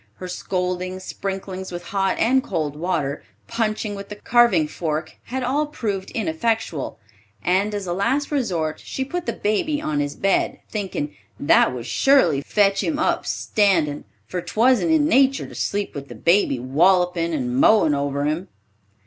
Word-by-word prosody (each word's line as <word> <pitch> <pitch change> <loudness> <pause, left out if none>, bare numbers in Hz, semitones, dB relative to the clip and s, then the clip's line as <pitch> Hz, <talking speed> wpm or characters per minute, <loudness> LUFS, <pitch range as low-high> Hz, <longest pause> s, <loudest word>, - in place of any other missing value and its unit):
Her 185 - -7
scoldings, 185 0 -3
sprinklings 190 -1 -5
with 175 0 -6
hot 195 -1 0
and 260 +3 +3
cold 155 -5 -2
water, 150 -4 -2 0.2
punching 215 -2 -1
with 200 0 -8
the 210 - -6
carving 235 -7 +3
fork, 155 0 -3
had 260 +1 -3
all 285 +4 0
proved 205 -9 -3
ineffectual, 210 - -1 0.5
and 200 - +1
as 200 -2 -3
a 175 - -2
last 270 +11 0
resort, 180 - -1
she 265 - -3
put 350 +5 -4
the - - +1
baby 290 +9 0
on 150 - -2
his 145 0 -2
bed, 195 -1 +1
thinking 190 -8 -3 0.2
"that 145 - +4
would 125 -2 -6
surely 170 - +3
fetch 195 +4 +2
him 310 - -1
up 310 - 0
standin', 170 -9 +1 0.2
for 180 - -4
'twasn't 250 - +2
in 315 -2 +4
natur 275 -3 +3
to - - -11
sleep 205 0 -2
with 140 -1 -7
the - - -10
baby 170 -6 +3
wollopin' 170 +6 +2
and 125 -6 -2
mowin' 205 -9 +5
over 140 0 -1
him." 155 +6 -1
190 Hz, 160 wpm, -22 LUFS, 160-225 Hz, 0.5 s, mowin